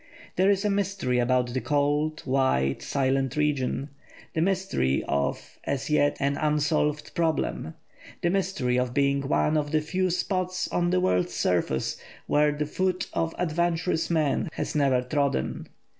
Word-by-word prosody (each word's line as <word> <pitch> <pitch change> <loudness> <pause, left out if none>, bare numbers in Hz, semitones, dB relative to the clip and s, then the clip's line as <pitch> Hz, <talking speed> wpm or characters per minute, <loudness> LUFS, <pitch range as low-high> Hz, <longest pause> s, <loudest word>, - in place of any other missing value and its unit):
There 190 +2 +3
is 200 0 +2
a - - +3
mystery 195 -11 0
about 125 0 +1
the 130 - -1
cold, 145 +1 0
white, 130 - +1
silent 135 0 0
region; 145 -2 0 0.4
the 160 - 0
mystery 180 - +1
of, 70 0 -2
as 140 +2 -2
yet, 145 -1 +3
an 140 0 0
unsolved 150 0 0
problem; 160 - -1 0.5
the 170 - +2
mystery 185 -10 0
of 125 0 -2
being 140 0 +2
one 150 +2 +2
of 145 -1 -1
the 155 +1 +2
few 185 +4 0
spots 185 +1 -1
on 175 0 +1
the 180 +1 +2
world's 90 - +1
surface 85 -7 0 0.3
where 150 0 +3
the 150 +1 -2
foot 185 +4 -1
of 165 0 -1
adventurous 170 0 0
man 155 -3 +1
has - - -3
never 135 -4 +2
trodden. 140 - -1
150 Hz, 150 wpm, -26 LUFS, 130-175 Hz, 0.5 s, There